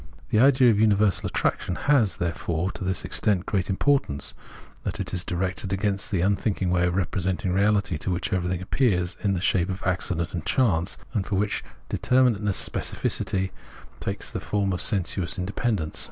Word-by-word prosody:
The 105 - +4
idea 130 -1 +6
of 105 - +1
universal 105 -2 +3
attraction 90 - -1
has, 115 - +2
therefore, 85 +1 -2
to - - -7
this 95 0 -1
extent 100 -4 +1
great 95 -2 -1
importance, 95 - +1 0.5
that - - -4
it - - -2
is 90 -1 0
directed 90 +1 -2
against 100 0 -1
that 95 -4 0
unthinking 100 -1 0
way 90 0 +3
of 90 - -1
representing 95 -1 -1
reality, 100 -4 +2
to - - -3
which 90 0 -1
everything 90 -1 -1
appears 95 -6 +1
in 100 -2 +2
the 90 - -1
shape 95 -2 +1
of 95 +1 -4
accident 90 -2 -1
and 85 -3 -3
chance, 95 -8 +1 0.2
and 105 -5 -1
for 100 - -1
which 100 +2 0 0.3
determinateness, 115 -7 +2
specificity, 95 0 -1 0.5
takes - - -3
the - - -3
form 100 -2 -1
of 90 - -2
sensuous 90 -2 0
independence. 95 -3 -1
95 Hz, 170 wpm, -25 LUFS, 90-105 Hz, 0.5 s, idea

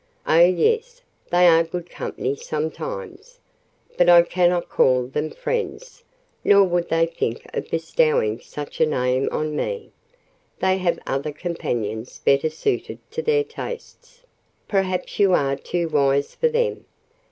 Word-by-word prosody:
"Oh, 160 - +4
yes, 455 - +2 0.3
they 175 0 +5
are 165 -1 +6
good 170 +1 -6
company 135 -5 -4
sometimes; 420 - -6 0.6
but 175 0 +5
I 175 -1 +8
cannot 175 0 +1
call 125 -1 +3
them 150 +5 -3
friends, 485 - -4 0.4
nor 200 0 +6
would 175 -2 0
they 165 0 +3
think 165 -8 -3
of - - -4
bestowing 155 -8 +1
such 145 +4 -7
a 160 - +5
name 130 -2 0
on 155 0 -2
me—they - - -4
have 180 -2 +1
other 140 +3 -2
companions 120 - -4
better 140 +3 +2
suited 160 - -2
to 470 - -3
their 455 -1 +2
tastes." 485 +2 -9 0.4
"Perhaps 190 -2 -1
you 195 -2 +5
are 140 -4 +2
too 170 +4 -3
wise 140 -2 +1
for 480 - +1
them. 475 0 -1
175 Hz, 135 wpm, -22 LUFS, -, 0.6 s, I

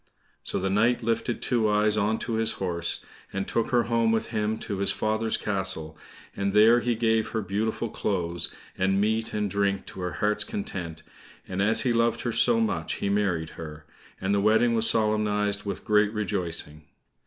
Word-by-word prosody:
So - - -2
the 95 +1 -1
knight 115 +4 +2
lifted 115 +1 -1
Two 115 -3 +2
eyes 105 0 +3
on 105 +1 +1
to 115 - -3
his 110 0 +1
horse, 85 -3 -2 0.3
and 95 0 -3
took 115 - 0
her 120 -2 +3
home 115 -1 +2
with 115 - 0
him 110 -1 -1
to 100 -4 -5
his 100 - +2
father's 110 +1 0
castle, 95 -6 -2 0.4
and 100 0 -1
there 110 +3 +6
he 120 -1 0
gave 110 -1 +1
her 110 - -2
beautiful 105 +4 -1
clothes, 85 -6 -2 0.2
and 95 +1 +1
meat 110 +2 0
and 105 -1 -1
drink 100 0 0
to - - -10
her 90 -2 -3
heart's 105 +6 0
content, 95 - -5 0.4
and 95 +1 -2
as 110 +3 +2
he 125 - +1
loved 115 0 +2
her 120 - -1
so 230 - +4
much 225 -1 -1
he 100 - -2
married 95 -6 0
her, 75 -1 -8 0.3
and 95 +1 0
the 100 - +2
wedding 110 +3 +4
was 115 -1 +3
solemnized 105 -1 +1
with 100 - -5
great 105 0 +3
rejoicing. 85 -8 -3
105 Hz, 185 wpm, -26 LUFS, 95-115 Hz, 0.4 s, there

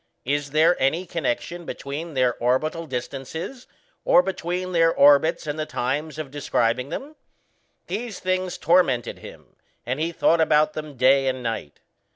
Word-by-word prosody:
Is 145 +1 -1
there 155 +4 +4
any 160 +7 +1
connection 170 +1 -3
between 155 +1 -6
their 125 -2 +2
orbital 155 +7 0
distances, 140 - -6 0.4
or 180 - +5
between 185 0 -3
their 165 -1 +4
orbits 145 +4 +4
and 150 +1 -4
the 155 - -2
times 145 +5 -2
of 155 -4 -6
describing 125 -3 0
them? 285 - -6 0.7
These 230 -3 -5
things 185 0 -1
tormented 165 -8 +2
him, - - -14 0.3
and 130 +4 -2
he 165 +2 -1
thought 165 0 +2
about 155 -1 +3
them 150 -3 -7
day 135 +2 +4
and 130 -1 -2
night. 110 -11 -5
155 Hz, 150 wpm, -24 LUFS, 135-170 Hz, 0.7 s, or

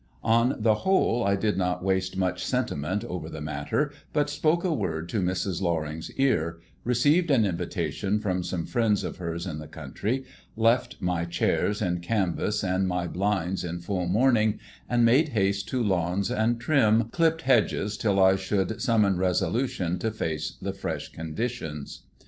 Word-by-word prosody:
On 115 +3 +3
the 110 0 +4
whole, 120 - +2
I 100 0 +2
did 105 0 0
not 90 -1 -1
waste 95 -1 0
much 90 -1 0
sentiment 105 - -1
over 90 -7 -5
the 80 - -7
matter, 75 - -1 0.2
but 145 -1 +1
spoke 155 +3 +1
a 180 -3 +1
word 80 - -3
in 105 - +1
Mrs. 95 0 -1
Loring's 80 -3 -2
ear, 85 -12 +1 0.3
received 145 +8 +3
an 125 -7 +4
invitation 90 +2 -1
from 95 -4 -1
some 85 -1 -3
friends 115 -5 +1
of - - -5
hers 85 -1 -4
in 80 -5 -4
the 75 - -8
country, 105 - -3 0.3
left 115 +2 +2
my 90 -2 0
chairs 105 +4 0
in 90 -2 0
canvas 100 +2 -1
and 95 0 +1
my 90 -1 -1
blinds 95 -1 -1
in 85 0 -4
full 90 0 -2
mourning, 110 +1 +3 0.3
and 120 -1 +3
made 135 +7 +4
haste 100 0 +1
to 125 -2 0
lawns 95 -1 0
and 115 +2 +1
trim, 115 -4 +3
clipped 165 -1 +2
hedges 105 -5 +2
till 100 -2 +1
I 95 0 +5
should 95 +3 -1
summon 105 -6 +3
resolution 90 0 0
to 110 - 0
face 80 -8 -3
the - - -3
fresh - - -4
conditions. 80 - -5
100 Hz, 165 wpm, -27 LUFS, 90-115 Hz, 0.3 s, I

